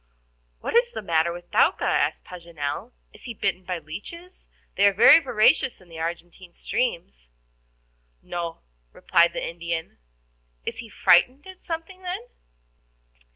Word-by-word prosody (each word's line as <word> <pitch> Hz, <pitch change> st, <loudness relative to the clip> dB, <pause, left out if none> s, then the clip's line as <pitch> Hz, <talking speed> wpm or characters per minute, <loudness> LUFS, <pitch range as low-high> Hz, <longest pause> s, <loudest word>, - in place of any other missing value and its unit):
"What -, -, -4 dB
is 480 Hz, 0 st, +4 dB
the 220 Hz, -, -6 dB
matter 165 Hz, -2 st, +1 dB
with 175 Hz, 0 st, -10 dB
Thaouka?" -, -, +3 dB
asked -, -, 0 dB
Paganel. 170 Hz, -5 st, -6 dB, 0.2 s
"Is -, -, -15 dB
he 235 Hz, -, -6 dB
bitten 195 Hz, -2 st, -1 dB
by 180 Hz, -1 st, -3 dB
the 160 Hz, -, -14 dB
leeches? 335 Hz, -, -10 dB, 0.3 s
They 200 Hz, -, +5 dB
are 200 Hz, -, +3 dB
very 235 Hz, -, +8 dB
voracious 265 Hz, -1 st, +2 dB
in 185 Hz, -2 st, -20 dB
the 165 Hz, -1 st, -10 dB
Argentine 170 Hz, +2 st, -6 dB
streams." 165 Hz, -, -3 dB, 0.9 s
"No," 170 Hz, -1 st, -5 dB, 0.3 s
replied 170 Hz, 0 st, +3 dB
the -, -, -3 dB
Indian. 170 Hz, -1 st, -5 dB, 0.7 s
"Is -, -, -4 dB
he 230 Hz, -, -8 dB
frightened 255 Hz, -, +3 dB
at 375 Hz, -1 st, -12 dB
something, 330 Hz, +3 st, -6 dB
then?" 365 Hz, +3 st, -4 dB
185 Hz, 145 wpm, -24 LUFS, 170-270 Hz, 0.9 s, very